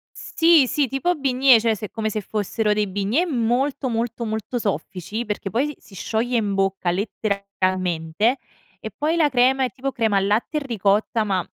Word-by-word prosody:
Sì, 325 -5 +3
sì, 285 +2 +1
tipo 270 +8 0
bignè, 265 -3 +4
cioè 225 0 +1
se 210 +1 -6
è - - -32
come 220 -1 -3
se 215 - -2
fossero 210 +1 -1
dei 210 0 +1
bignè 205 - 0
molto, 265 0 0
molto, 230 0 -2
molto 220 +3 -3
soffici, 200 +3 -3
perché 210 -2 -4
poi 240 +8 +1
si 295 -1 -5
si 195 - -17
scioglie 230 +5 -1
in 210 -3 0
bocca 195 -2 0
letteralmente 190 0 -1 0.4
e - - -7
poi 310 +3 0
la 315 -3 +3
crema 260 +1 +3
è 255 - -1
tipo 270 +1 -3
crema 220 -5 +1
al 195 0 +1
latte 220 +9 0
e - - +2
ricotta, 215 0 +1
ma 190 -4 0
225 Hz, 185 wpm, -22 LUFS, 200-260 Hz, 0.4 s, bignè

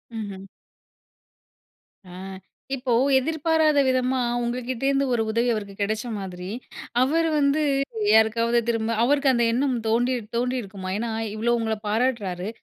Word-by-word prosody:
ம்ஹ்ம். 200 -3 -6 1.6
ஆ, - - -14 0.7
இப்போ 255 -1 -3 0.3
எதிர்பாராத 315 +1 +2
விதமா 255 0 +1 0.2
உங்ககிட்ட 245 +1 -3
இருந்து 275 0 +2
ஒரு 235 - +1
உதவி 235 +2 +1
அவருக்கு 205 -2 -5
கிடைச்ச 215 +4 -1
மாதிரி, 180 -2 -7 0.5
அவர் 325 +6 +2
வந்து 285 +1 +2 0.5
யாருக்காவது 230 +2 +4
திரும்ப, 225 -1 0
அவருக்கு 280 +2 +3
அந்த 235 -1 +2
எண்ணம் 260 +1 +1
தோண்டி 240 +3 +2 0.2
தோணியிருக்குமா, 235 -6 -3
ஏன்னா, 230 +1 -3 0.2
இவ்வளவு 235 +2 +1
உங்கள 220 -1 -1
பாராட்டுறாரு. 210 -5 -1
235 Hz, 120 wpm, -24 LUFS, 220-260 Hz, 1.6 s, யாருக்காவது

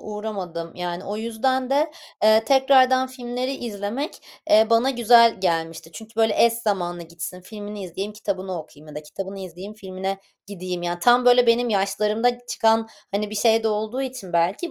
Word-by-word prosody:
uğramadım. 195 -6 -6
Yani, 175 0 -5
o 205 +1 -4
yüzden 250 +4 -1
de, 295 +3 +2 0.3
eee, 220 +1 +5
tekrardan 260 -1 +4
filmleri 255 0 -4
izlemek, 230 +4 -5 0.3
eee, 220 +1 +6
bana 230 +3 +4
güzel 235 -3 +5
gelmişti. 165 -2 -2
Çünkü 220 +6 -12
böyle 225 -1 +4
eş 235 - +4
zamanlı 190 -7 -2
gitsin, 170 +2 -8
filmini 205 +2 -8
izleyeyim; 195 +4 -5
kitabını 190 -4 -4
okuyayım 155 -1 -13
ya 150 - -11
da 150 - -6
kitabını 195 +6 -7
izleyeyim, 190 +3 -9
filmine 190 -1 -5 0.3
gideyim. 185 -3 -5
Ya, 175 0 -2
tam 245 +5 +4
böyle 245 0 +6
benim 235 +1 +3
yaşlarımda 215 +5 0
çıkan, 225 -1 +2 0.2
hani, 205 +1 -2
bir - - -6
şey 225 +1 +3
de 220 - +1
olduğu 220 +5 -2
için 255 -8 -7
belki, 180 - 0
210 Hz, 165 wpm, -23 LUFS, 185-240 Hz, 0.3 s, eee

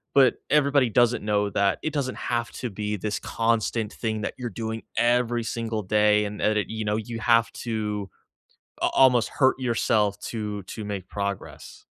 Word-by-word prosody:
but 135 -3 +6
everybody 140 -3 +3
doesn't 120 0 +3
know 105 -1 +1
that 100 -1 +2
it 155 - -2
doesn't 135 -4 -2
have 120 -1 -2
to 125 - -5
be 105 +1 -3
this 105 +1 -3
constant 115 -1 0
thing 110 -2 -3
that - - -3
you're 120 - -3
doing 110 +1 -4 0.2
every 120 0 +2
single 115 -1 -3
day 105 +1 +3
and 105 0 -6
and - - +3
that 105 - 0
it 105 - 0
you 110 -1 -4
know, 105 0 +1
you 115 +1 -4
have 115 0 +3
to 105 -4 -3 0.7
a - - +3
almost 125 -3 +4
hurt 130 -1 +2
yourself 110 -4 +1
to 105 -2 -4
to 105 +3 -7
make 100 -3 -5
progress. 100 -1 -5
110 Hz, 180 wpm, -25 LUFS, 105-120 Hz, 0.7 s, but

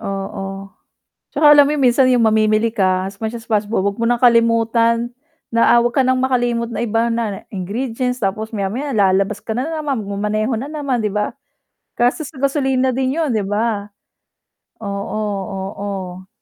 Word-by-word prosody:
Oo, 195 0 -5 0.6
pero 295 +1 +6
alam 290 -1 +7
mo 300 - 0
yung 285 - -1
minsan 255 +1 +4
yung 245 -2 +3
mamimili 215 +1 +3
ka, 185 -3 +1
as 200 - -18
much 220 +1 -3
as 230 - -9
possible, 210 -2 0
'wag 200 +2 -1
mo 230 - 0
nang 240 +1 +1
kalimutan 230 0 +3 0.4
na 230 0 +3
ah, - - +6
'wag 240 0 0
ka 265 - +6
nang 260 0 +3
makalimot 240 -2 0
na - - -5
iba 225 +2 +1
kunwari 225 -4 -2
ingredients 240 +5 -3
tapos 215 +3 -2
maya-maya 225 +8 -2
lalabas 195 0 +2
ka - - -8
na 250 +5 -2
naman, 305 -5 -2
magma-maneho 210 +4 -1
na 270 +6 -5
naman 280 -6 -2
'di 210 - 0
ba? 210 +3 -2 0.6
Gastos 250 +5 +1
sa 300 - -18
gasolina 265 -2 +1
din 260 +2 -1
yun, 315 -5 0
'di 215 -2 0
ba? 210 -1 -1 0.9
Oo, 200 0 -4 0.3
oo. 190 -1 -6
230 Hz, 170 wpm, -19 LUFS, 205-255 Hz, 0.9 s, alam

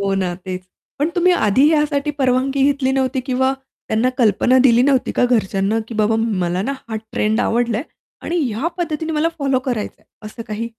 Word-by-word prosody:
हो 195 -1 0
ना, 185 -2 -1
तेच. 185 0 -7 0.4
पण 295 +3 +1
तुम्ही 360 0 +3
आधी 265 - +3
यासाठी 295 -1 +1
परवानगी 265 +1 +1
घेतली 275 -2 +1
नव्हती, 265 -1 0
किंवा 260 +1 +1 0.4
त्यांना 220 +3 +1
कल्पना 245 +3 +3
दिली 235 0 +4
नव्हती 265 -1 +2
का - - +2
घरच्यांना, 215 -3 +1
की 235 - -7
बाबा 215 +1 +2
मला 185 -5 -1
ना, 275 - -2 0.2
हा 220 - -3 0.2
ट्रेंड 215 +1 +1
आवडलाय 235 0 0 0.4
आणि 345 +1 -2
ह्या 230 +10 -2
पद्धतीने 320 -1 -2
मला 310 +2 +1
फॉलो 275 -2 +1
करायचं 245 -5 -3
आहे, - - -32 0.2
असं 230 +2 -8
काही? 220 +2 -4
250 Hz, 185 wpm, -19 LUFS, 215-275 Hz, 0.4 s, दिली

